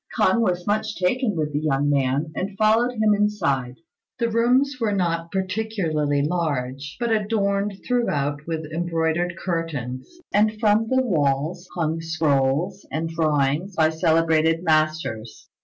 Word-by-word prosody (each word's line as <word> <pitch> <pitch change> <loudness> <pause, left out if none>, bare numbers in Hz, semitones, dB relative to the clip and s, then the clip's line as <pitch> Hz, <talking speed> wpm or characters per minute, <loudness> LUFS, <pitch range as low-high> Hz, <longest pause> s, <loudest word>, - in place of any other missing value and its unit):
K'ung 235 - +3
was 180 -5 0
much 215 +1 -1
taken 210 +4 0
with 150 -2 -2
the 145 - +1
young 145 -2 0
man, 140 +2 +1
and 195 +1 -4
followed 225 +3 +3
him 215 -2 +3
inside. 140 -12 0 0.4
The 235 -2 0
rooms 255 +4 +2
were 215 -3 +1
not 170 -3 -1
particularly 185 -8 -1
large, 145 -4 -2
but 235 -1 -1
adorned 205 -2 0
throughout 145 - -1
with 160 -1 -3
embroidered 170 +1 -1
curtains, 150 -9 -4 0.2
and 215 +1 +2
from 215 0 +3
the 260 0 +2
walls 160 - 0
hung 165 -1 -1
scrolls 160 +2 0
and 160 +1 -2
drawings 155 +2 0
by 160 -1 +4
celebrated 160 0 +2
masters. 155 -8 -1
165 Hz, 135 wpm, -23 LUFS, 150-210 Hz, 0.4 s, by